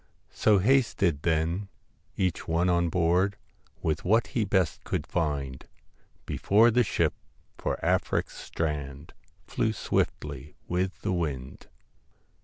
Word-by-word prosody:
' - - -41
So 105 -2 +6
hasted 100 - +2
then 85 +5 0 0.5
each 90 -3 -1
one 85 +2 +2
on 85 -1 +2
board, 90 +4 +2 0.5
With 80 - 0
what 110 +5 +3
he 115 -6 -1
best 95 -5 0
could - - -2
find, 70 -6 -2 0.6
Before 110 +4 +4
the 125 +2 +4
ship - - +1 0.5
for - - -1
Afric's - - 0
strand 75 -2 -4 0.3
Flew 110 - 0
swiftly 75 -7 -2
with 95 +2 -1
the 100 - 0
wind. 70 -7 -4
85 Hz, 120 wpm, -28 LUFS, 75-100 Hz, 0.6 s, So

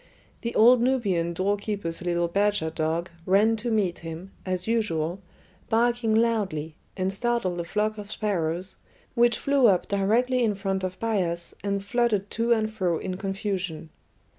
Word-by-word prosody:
The 235 0 -4
old 240 +2 +7
Nubian 205 -10 +1
doorkeeper's 200 -1 -2
little 175 -1 0
badger 200 -2 +1
dog 165 +2 -2 0.2
ran 210 +4 +4
to 235 +3 -3
meet 205 -6 0
him, 165 +3 -8 0.2
as 185 +1 -1
usual, 195 -6 0 0.5
barking 235 0 +2
loudly, 200 -10 0 0.2
and 190 0 0
startled 215 -5 -1
a - - -1
flock 215 +4 -1
of 205 0 -8
sparrows, 185 -3 -2 0.4
which 240 -1 +3
flew 275 -3 +3
up 185 -4 +2
directly 235 +6 +2
in 215 -3 +1
front 195 -1 -2
of 185 0 -4
Bias 180 -7 -1
and 200 -1 -1
fluttered 210 -3 0
to 230 +1 0
and 220 -1 +2
fro 180 -6 0
in 185 +1 -4
confusion. 190 -5 -3
200 Hz, 150 wpm, -26 LUFS, 175-225 Hz, 0.5 s, old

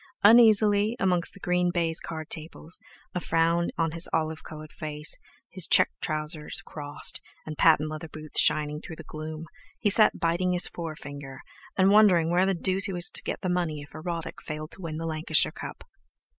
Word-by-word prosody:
Uneasily, 215 -1 +5
amongst 180 -1 +1
the - - -13
green 180 -1 0
baize 170 -2 -1
card 160 -2 -7
tables, 160 +1 -5 0.3
a 180 - -1
frown 170 0 +1
on 165 -1 0
his 165 +1 +1
olive 160 -1 -2
coloured 155 -1 -10
face, 150 +1 -4 0.4
his - - +3
check - - +6
trousers 155 +2 -2
crossed, 145 -1 -4 0.2
and 155 - -6
patent 155 -1 +4
leather 155 +1 -6
boots 155 -1 +2
shining 150 0 +2
through 160 - -9
the 160 - -11
gloom, 155 +1 -7 0.3
he 205 - +2
sat 215 +1 +4
biting 175 +2 0
his 180 - +1
forefinger, 145 -4 -8 0.4
and 190 0 +4
wondering 185 -6 +5
where 180 +2 +3
the 195 - +1
deuce 190 +3 0
he 200 - -3
was 175 -1 -1
to - - 0
get - - -5
the - - -3
money 175 -4 -1
if 145 - -14
Erotic 165 +1 -6
failed 155 0 -7
to - - -5
win 160 -3 -5
the 165 - -5
Lancashire 155 -1 +1
Cup. - - -9
165 Hz, 185 wpm, -26 LUFS, 155-180 Hz, 0.4 s, check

